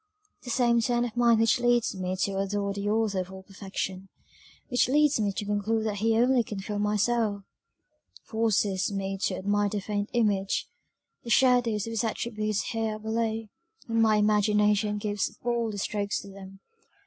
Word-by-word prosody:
"The 245 - -9
same 235 -1 +3
turn 240 +1 +1
of 235 -2 -6
mind 235 -2 +4
which 225 +1 +3
leads 240 -1 +2
me 185 0 -3
to 195 -1 -1
adore 200 0 -1
the 200 +1 -3
Author 215 -3 +1
of 185 0 -5
all 190 0 -10
Perfection 195 -1 -6 0.6
which 245 -1 +2
leads 295 -1 +3
me 205 -2 +1
to 205 - -4
conclude 210 +2 0
that 210 -2 -2
he 225 +1 +2
only 250 +1 +4
can 210 -2 -6
fill 205 +1 -4
my 210 0 +1
soul; 210 -2 0 0.8
forces 210 -4 0
me 195 0 -3
to 185 - -1
admire 205 +2 0
the 205 - -2
faint 205 +1 -3
image 205 -5 +1 0.6
the 235 - -8
shadows 245 -4 +3
of 230 - -5
his 225 -1 -1
attributes 215 -2 -2
here 225 -1 -2
below; 220 0 -2 0.4
and 230 -1 +1
my 220 -1 +4
imagination 210 0 +2
gives 205 -1 -1
still - - -7
bolder 235 -3 -1
strokes 205 0 -2
to 200 - -11
them. 195 0 -12
210 Hz, 175 wpm, -27 LUFS, 200-230 Hz, 0.8 s, mind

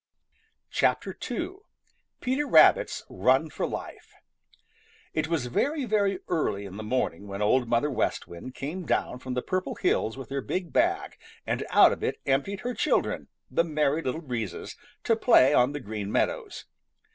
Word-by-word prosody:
II. 375 - -1 0.6
PETER 265 +4 0
RABBIT'S 160 - +5
RUN 130 +11 +2
FOR - - -2
LIFE - - -8 1.0
|IT 155 0 0
was 160 -6 -1
very, 280 - 0
very 200 -3 +1
early 105 - -1
in 95 0 -8
the - - -5
morning 105 -5 -2
when 100 0 -6
Old 120 +3 +2
Mother 120 +5 +2
West 125 - -1
Wind 85 +9 -9
came 160 +7 -5
down 125 - 0
from 125 0 -5
the 125 - -1
Purple 185 0 -2
Hills 110 +3 0
with 135 -1 -9
her 140 0 -1
big 175 -3 -4
bag - - +1 0.3
and - - -1
out - - +7
of - - -4
it - - -1
emptied 140 +9 0
her 245 +1 -3
children, - - 0 0.2
the 165 - +3
Merry 155 -1 +1
Little 145 +3 -3
Breezes, 120 -7 -4 0.3
to 225 - +3
play 185 - +5
on 125 -1 +4
the 145 - -4
Green 105 -4 -5
Meadows. - - -1
140 Hz, 160 wpm, -27 LUFS, 120-180 Hz, 1.0 s, out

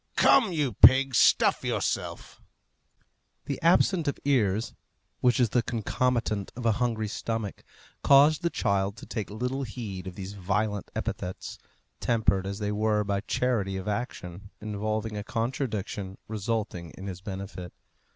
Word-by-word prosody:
Come, 225 -8 +5
you 150 -7 0
pig, 130 +6 +7
stuff - - +4
yourself!" - - -3 1.0
The 140 - -4
absence 170 0 +3
of 140 - 0
ears, 115 -6 +1 0.5
which 125 0 +3
is 120 -3 +3
the 120 - +2
concomitant 115 -2 -1
of 120 0 -6
a 115 - +5
hungry 110 -1 -1
stomach, 110 -1 -4 0.4
caused 145 +3 +6
the 170 - +1
child 100 -6 0
to - - -10
take 110 -4 -4
little 125 +6 -3
heed 105 -7 -6
of 90 - -7
these 95 0 -6
violent 105 +1 -1
epithets, 90 0 -4 0.4
tempered 110 -5 +1
as 100 0 -4
they 105 -1 -2
were 105 0 +1
by 100 -1 -1
charity 105 -4 0
of 95 +2 -6
action 100 -4 -4
involving 110 +1 -3
a 105 - -4
contradiction 110 -5 -3
resulting 105 -5 -3
in 95 - -8
his 95 -2 -6
benefit. 95 -2 -7
110 Hz, 140 wpm, -27 LUFS, 100-125 Hz, 1.0 s, pig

